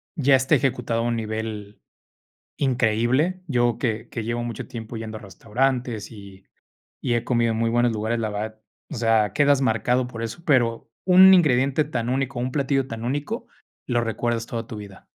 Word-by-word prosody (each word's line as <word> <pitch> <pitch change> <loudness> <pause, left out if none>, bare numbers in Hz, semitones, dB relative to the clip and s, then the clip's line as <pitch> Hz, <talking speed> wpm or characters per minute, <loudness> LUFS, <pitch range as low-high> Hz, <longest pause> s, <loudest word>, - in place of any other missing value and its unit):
ya 140 -4 +4
está 130 0 +3
ejecutado 125 -4 0
a - - -1
un 120 0 0
nivel 110 -2 -5 0.8
increíble. 130 +7 +1
Yo 120 -4 +1
que 115 -1 -2
que 115 - -4
llevo 120 +1 -2
mucho 120 -2 -5
tiempo 115 0 -7
yendo 110 -1 -6
a - - -12
restaurantes 120 +3 -2
y 100 -3 -13 0.6
y 120 - 0
he 120 0 0
comido 115 -2 +1
en 110 - -2
muy 115 0 +1
buenos 120 0 +2
lugares, 110 +2 -1
la 110 - -1
verdad, 110 +1 -5 0.3
o - - -6
sea, 110 -3 +2
quedas 140 +2 +3
marcado 125 +1 +1
por 115 -2 -7
eso, 115 +9 -6
pero 120 -7 +1 0.2
un 185 +1 +8
ingrediente 140 -4 +4
tan 125 -5 -3
único, 135 -1 -1
un 125 +1 -2
platillo 135 -1 0
tan 115 -2 -6
único, 145 - -3 0.4
lo 120 -2 +1
recuerdas 115 0 -1
toda 115 -1 -5
tu 110 - -8
vida. 100 -2 -11
120 Hz, 180 wpm, -23 LUFS, 110-130 Hz, 0.8 s, un